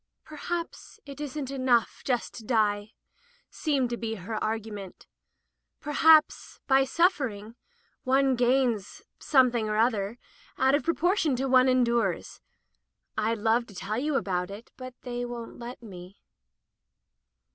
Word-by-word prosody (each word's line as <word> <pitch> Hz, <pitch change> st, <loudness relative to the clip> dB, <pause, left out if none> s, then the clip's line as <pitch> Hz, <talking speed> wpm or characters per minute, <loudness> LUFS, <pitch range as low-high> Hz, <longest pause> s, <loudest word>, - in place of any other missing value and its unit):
"Perhaps 335 Hz, +7 st, -6 dB
it 280 Hz, 0 st, -9 dB
isn't 285 Hz, -1 st, -5 dB
enough 255 Hz, -4 st, +1 dB
just 245 Hz, -3 st, -1 dB
to 230 Hz, -, -9 dB
die," 210 Hz, -2 st, 0 dB, 0.6 s
seemed 275 Hz, -6 st, 0 dB
to 240 Hz, -, -2 dB
be 225 Hz, -1 st, -3 dB
her 215 Hz, +3 st, -5 dB
argument. 215 Hz, -3 st, -5 dB, 0.7 s
"Perhaps, 310 Hz, +1 st, +3 dB
by 270 Hz, -1 st, +4 dB
suffering, 265 Hz, -, 0 dB, 0.5 s
one 265 Hz, 0 st, +3 dB
gains 245 Hz, -4 st, 0 dB
— -, -, -50 dB
something 245 Hz, -6 st, +3 dB
or 210 Hz, -, -1 dB
other 220 Hz, -1 st, +1 dB, 0.2 s
— -, -, -28 dB
out 265 Hz, +1 st, +3 dB
of 285 Hz, -, +3 dB
proportion 335 Hz, -2 st, +1 dB
to 255 Hz, -, -2 dB
what 265 Hz, -, -2 dB
one 255 Hz, 0 st, +6 dB
endures. 235 Hz, -7 st, 0 dB, 0.7 s
Fd 220 Hz, 0 st, -1 dB
love 235 Hz, +2 st, +2 dB
to 200 Hz, -, -14 dB
tell 210 Hz, +5 st, -3 dB
you 295 Hz, +2 st, -1 dB
about 180 Hz, -6 st, -1 dB
it, 205 Hz, +4 st, -10 dB
but 255 Hz, -1 st, -9 dB
they 245 Hz, -1 st, -4 dB
won't 240 Hz, -1 st, -7 dB
let 240 Hz, +1 st, -8 dB
me. 185 Hz, -2 st, -11 dB
245 Hz, 140 wpm, -27 LUFS, 220-270 Hz, 0.7 s, one